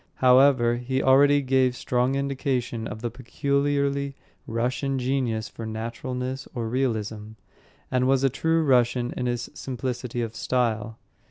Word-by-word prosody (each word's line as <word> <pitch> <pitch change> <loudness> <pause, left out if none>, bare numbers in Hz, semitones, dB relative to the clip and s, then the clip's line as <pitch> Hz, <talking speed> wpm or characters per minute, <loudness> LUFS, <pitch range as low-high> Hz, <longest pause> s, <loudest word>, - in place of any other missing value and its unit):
However, 125 -2 +5
he 130 +2 -2
already 140 +2 +5
gave 130 -1 +2
strong 125 +2 0
indication 135 -4 -2
of 110 +2 -8
the 120 - -2
peculiarly 140 +2 -1 0.3
Russian 125 +4 -1
genius 125 -4 -1
for 115 - -9
naturalness 125 +4 -4
or 115 -2 -2
realism, 110 -4 -2 0.6
and 125 0 +2
was 135 0 +3
a 135 - +4
true 160 +4 +1
Russian 125 -3 +2
in 125 - -2
his 120 0 -3
simplicity 125 -1 -4
of 115 0 -5
style. 115 -3 -1
125 Hz, 135 wpm, -25 LUFS, 120-135 Hz, 0.6 s, However